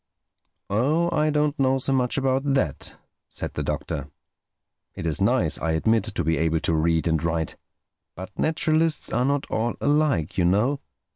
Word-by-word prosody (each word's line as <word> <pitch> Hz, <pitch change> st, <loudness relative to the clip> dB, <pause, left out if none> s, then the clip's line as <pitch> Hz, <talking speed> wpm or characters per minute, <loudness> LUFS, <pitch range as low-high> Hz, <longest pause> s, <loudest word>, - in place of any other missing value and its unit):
"Oh, 150 Hz, +11 st, +1 dB
I 155 Hz, 0 st, +2 dB
don't 150 Hz, -1 st, 0 dB
know 135 Hz, 0 st, +3 dB
so 135 Hz, +1 st, 0 dB
much 125 Hz, -1 st, +1 dB
about 135 Hz, 0 st, +1 dB
that," 80 Hz, -, -2 dB, 0.3 s
said -, -, -3 dB
the -, -, -3 dB
Doctor. 70 Hz, -3 st, -3 dB, 0.9 s
"It -, -, -6 dB
is 80 Hz, -3 st, 0 dB
nice, -, -, +2 dB
I 80 Hz, -1 st, -1 dB
admit, 110 Hz, +6 st, +2 dB
to 110 Hz, -6 st, -3 dB
be 80 Hz, +1 st, 0 dB
able 80 Hz, 0 st, +1 dB
to -, -, +1 dB
read 80 Hz, +1 st, +1 dB
and 80 Hz, -1 st, +1 dB
write. 80 Hz, -1 st, -1 dB, 0.6 s
But 95 Hz, +3 st, -8 dB
naturalists 160 Hz, 0 st, +1 dB
are 120 Hz, +3 st, +2 dB
not 140 Hz, 0 st, 0 dB
all 115 Hz, +2 st, -1 dB
alike, 145 Hz, -, +1 dB
you 90 Hz, -, +3 dB
know. 110 Hz, +10 st, +2 dB
115 Hz, 165 wpm, -24 LUFS, -, 0.9 s, know